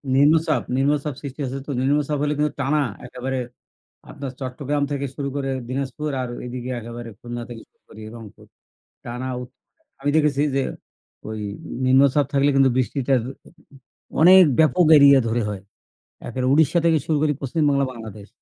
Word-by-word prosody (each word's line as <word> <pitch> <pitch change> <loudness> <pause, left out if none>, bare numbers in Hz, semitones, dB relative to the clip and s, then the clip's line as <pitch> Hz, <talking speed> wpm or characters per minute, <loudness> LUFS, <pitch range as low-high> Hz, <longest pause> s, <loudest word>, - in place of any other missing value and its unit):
নিম্নচাপ, 155 +3 +3
নিম্নচাপ 145 +1 0
সৃষ্টি 140 0 -8
হয়েছে 135 +1 -4
তো - - -3
নিম্নচাপ 145 +2 +1
হলে 150 - +1
কিন্তু 150 0 0
টানা 145 +2 +1 0.3
একেবারে 130 +1 -4 0.7
আপনার 135 -2 -6
চট্টগ্রাম 140 +3 -2
থেকে 140 0 -2
শুরু 140 -1 -3
করে 135 -1 -2 0.2
দিনাজপুর 135 +3 -3
আর 125 - -4 0.2
ঐদিকে 125 0 -6
একেবারে 120 0 -8
খুলনা 120 0 -6
থেকে 115 -2 -8
শুরু - - -48
করে 110 - -13
রংপুর। 115 -3 -12 0.6
টানা 125 +2 -5
ও - - -6 0.6
আমি 145 - 0
দেখেছি 145 -2 +2
যে 135 - +1 0.7
ওই 110 0 -5 0.5
নিম্নচাপ 135 +2 +4
থাকলে 140 +1 +3
কিন্তু 135 -1 +5
বৃষ্টিটার 130 0 +1 1.0
অনেক 185 +3 +9 0.2
ব্যাপক 160 +3 +4
এরিয়া 140 -1 +7
ধরে 115 +1 0
হয়। 100 -2 -5 0.7
একে 125 +2 -5
উড়িষ্যা 160 +3 +3
থেকে 160 -2 +4
শুরু 155 -2 +1
করি 150 -1 +2
পশ্চিমবাংলা, 140 0 +1
বাংলাদেশ। 110 -3 -10
135 Hz, 150 wpm, -22 LUFS, 125-150 Hz, 1.0 s, অনেক